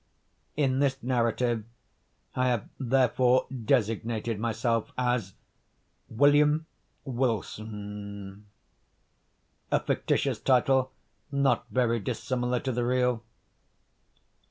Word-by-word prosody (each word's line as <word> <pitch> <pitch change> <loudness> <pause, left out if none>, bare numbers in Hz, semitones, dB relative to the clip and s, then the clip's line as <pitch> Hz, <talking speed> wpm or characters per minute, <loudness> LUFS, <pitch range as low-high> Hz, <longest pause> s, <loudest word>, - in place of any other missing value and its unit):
In 135 -3 +2
this 135 -1 +2
narrative 120 -2 +1 0.7
I 130 0 +2
have 120 -4 0
therefore 130 -1 +3
designated 115 -2 0
myself 115 0 -1
as 120 -6 0 0.7
William 145 +5 +4 0.4
Wilson,—a 105 -5 -4 1.4
fictitious - - 0
title 130 0 +3 0.4
not 140 -1 +1
very 120 -2 +1
dissimilar 125 +2 -1
to 130 - -2
the 120 0 -1
real. 125 -1 +1
125 Hz, 80 wpm, -28 LUFS, 115-130 Hz, 1.4 s, William